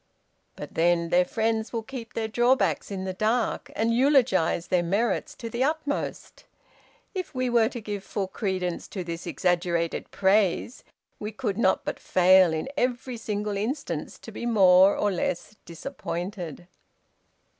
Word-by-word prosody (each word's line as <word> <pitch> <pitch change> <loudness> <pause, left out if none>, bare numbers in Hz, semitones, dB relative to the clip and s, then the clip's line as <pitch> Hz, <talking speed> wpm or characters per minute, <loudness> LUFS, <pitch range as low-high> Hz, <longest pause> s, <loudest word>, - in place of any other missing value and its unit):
But - - -8
then, 170 0 +2
their 180 +1 +4
friends 220 +1 -1
will 230 -2 -3
keep 240 -2 -8
their 225 -1 -1
drawbacks 240 +4 +2
in 195 -2 -4
the 190 - -3
dark, 220 +5 0
and 225 +1 +1
eulogize 235 - +3
their 180 -1 +3
merits 225 - -1
to 235 - -7
the 235 +3 -1
utmost. 295 0 -3 0.7
If 365 -7 -5
we 255 -1 0
were 230 -2 +4
to 250 - -6
give 205 -3 -5
full 195 -1 -3
credence 185 -3 -3
to 190 - -5
this 170 0 -6
exaggerated 170 -2 0
praise, 200 +4 +1 0.4
we 210 +1 -4
could 215 -3 -3
not 190 -5 +2
but - - -3
fail 185 -1 +5
in 160 +7 -2
every 250 -1 -1
single 210 -2 -3
instance 235 +9 -3
to - - -11
be 240 - -5
more 190 -3 +6
or 205 - +1
less 180 +3 -3
disappointed." 175 0 -6
210 Hz, 150 wpm, -26 LUFS, 180-235 Hz, 0.7 s, more